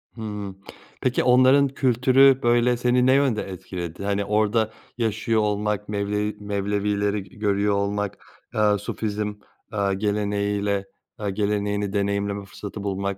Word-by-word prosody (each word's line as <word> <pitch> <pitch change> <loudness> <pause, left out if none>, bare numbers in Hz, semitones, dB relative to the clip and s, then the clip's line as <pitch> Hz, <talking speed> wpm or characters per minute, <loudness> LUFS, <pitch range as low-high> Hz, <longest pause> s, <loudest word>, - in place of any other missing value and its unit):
Hı. 105 -4 -5 0.5
Peki, 130 -1 +1
onların 130 +3 +5
kültürü, 130 +1 +4
böyle, 120 +1 +3
seni 125 +1 +2
ne 130 - +5
yönde 135 -5 +2
etkiledi? 90 -2 -6
Hani, 100 0 0
orada 110 +1 +1 0.3
yaşıyor 110 -1 0
olmak 105 0 -1
Mevlevi 105 +1 -1
Mevlevileri 100 0 -1
g 95 - -18
görüyor 100 0 +1
olmak, 100 0 -1 0.4
eee, 105 -1 +3
Sufizm, 105 0 -3 0.4
eee, 100 -2 +1
geleneğiyle 100 -1 0 0.3
eee, 105 -1 -2
geleneğini 100 0 -1
deneyimleme 100 0 -1
fırsatı 100 +1 -8
bulmak 100 0 -2
105 Hz, 125 wpm, -24 LUFS, 100-110 Hz, 0.5 s, onların